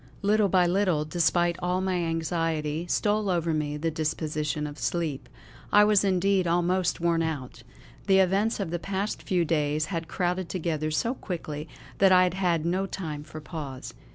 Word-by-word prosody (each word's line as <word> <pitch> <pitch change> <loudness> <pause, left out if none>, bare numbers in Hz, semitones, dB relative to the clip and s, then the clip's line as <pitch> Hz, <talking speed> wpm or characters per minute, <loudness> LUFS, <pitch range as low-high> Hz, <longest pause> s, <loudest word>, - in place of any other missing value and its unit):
Little 205 0 +3
by 180 -1 +4
little, 175 -4 +1
despite 175 +1 +1
all 180 +1 0
my 190 0 -1
anxiety, 165 -1 -1
stole 210 +2 +1
over 170 -2 0
me 150 -1 -2
the 165 +2 -1
disposition 150 -1 -2
of 145 -1 -7
sleep. 140 +3 -2 0.4
I 205 - +7
was 210 -1 +4
indeed 190 -1 +2
almost 175 +1 +1
worn 170 -1 +1
out. 140 -7 -4 0.5
The 190 -1 +5
events 195 +4 +2
of 190 -5 -3
the 175 - -2
past 195 +3 -3
few 180 -3 0
days 150 -1 0
had 165 -1 -3
crowded 180 0 -1
together 160 -4 -2
so 230 +10 0
quickly 155 - -6 0.3
that 195 -1 +6
I 185 0 +7
had 180 -1 +1
had 175 -4 0
no 185 +3 0
time 155 -7 -5
for 155 0 -9
pause. 145 -4 -7
170 Hz, 170 wpm, -27 LUFS, 155-185 Hz, 0.5 s, I